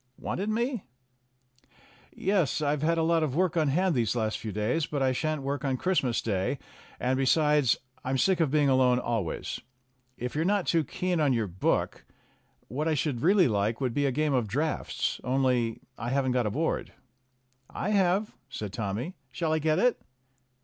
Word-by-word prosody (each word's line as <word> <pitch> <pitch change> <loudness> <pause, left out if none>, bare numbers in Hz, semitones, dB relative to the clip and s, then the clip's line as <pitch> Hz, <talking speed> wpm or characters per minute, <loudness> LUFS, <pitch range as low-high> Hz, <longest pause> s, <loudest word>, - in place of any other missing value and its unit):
"Wanted 200 +4 -3
me?" 235 0 -1 1.3
"Yes, 185 - +1
I've 150 -1 0
had 165 +2 +2
a 165 - +2
lot 165 0 +3
of 145 -4 -1
work 180 0 +1
on 160 -3 +2
hand 180 +6 +2
these 120 -4 +1
last 110 -2 -1
few 110 - -5
days. 110 - 0
But 145 -2 -1
I 130 - +3
shan't 155 +2 -1
woik 140 +1 -2
on 135 -2 0
Christmas 135 -8 0
Day, 100 +4 -1 0.4
and, 130 +1 +1
besides, 145 0 +3 0.3
I'm 130 +1 0
sick 190 +6 +2
of 160 -4 +3
being 145 0 +3
alone 130 -2 +4
always. 115 -8 -3 0.6
If 125 +1 -4
you're 155 - 0
not 200 +1 +1
too 165 -2 +2
keen 180 +5 -2
on 145 -4 +3
your 115 -3 +1
book, 95 -1 -1 0.6
what 145 +8 -2
I 160 - +2
should 140 -4 -1
really 185 +2 +5
like 110 +1 0
would 130 -3 -1
be 145 +2 +1
a - - +1
game 150 +2 0
of 125 -4 +1
draughts. 150 +10 -2
Only, 125 -3 +1 0.2
I 120 - -3
haven't 130 0 +1
got 125 -3 +1
a - - +1
board." 155 +10 -2 0.8
"I 195 - -3
have," 195 0 +2 0.2
said 105 -3 -6
Tommy. 110 - -3 0.2
"Shall 155 +4 -1
I 160 - +2
get 155 0 +1
it?" 250 -1 +2
140 Hz, 185 wpm, -28 LUFS, 125-165 Hz, 1.3 s, really